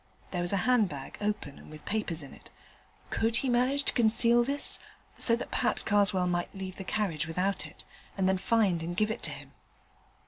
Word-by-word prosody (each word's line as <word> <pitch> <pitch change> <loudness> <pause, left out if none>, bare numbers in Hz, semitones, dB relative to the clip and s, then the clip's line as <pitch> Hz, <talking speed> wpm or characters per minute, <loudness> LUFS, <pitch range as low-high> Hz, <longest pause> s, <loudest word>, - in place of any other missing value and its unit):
There 180 - -1
was 175 - -1
a 200 - +2
handbag, 205 - +1
open, 205 -9 -2
and - - -14
with 155 0 -10
papers 195 -7 -2
in 140 - -10
it. - - -14 0.6
Could 225 +1 +1
he 260 +3 +1
manage 255 +4 +2
to - - +3
conceal 235 0 +4
this 280 +3 0 0.4
(so 230 - +4
that 235 - -6
perhaps - - +1
Karswell 200 -3 +3
might 175 +2 -1
leave 190 -1 -6
the 195 - -5
carriage 180 -7 -1
without 185 +4 -1
it), - - -14 0.3
and 190 -1 +2
then 190 0 +2
find 195 -5 +2
and 175 +2 -4
give 215 +1 +2
it 225 - -4
to - - -2
him? 140 -1 -9
195 Hz, 200 wpm, -30 LUFS, 175-230 Hz, 0.6 s, conceal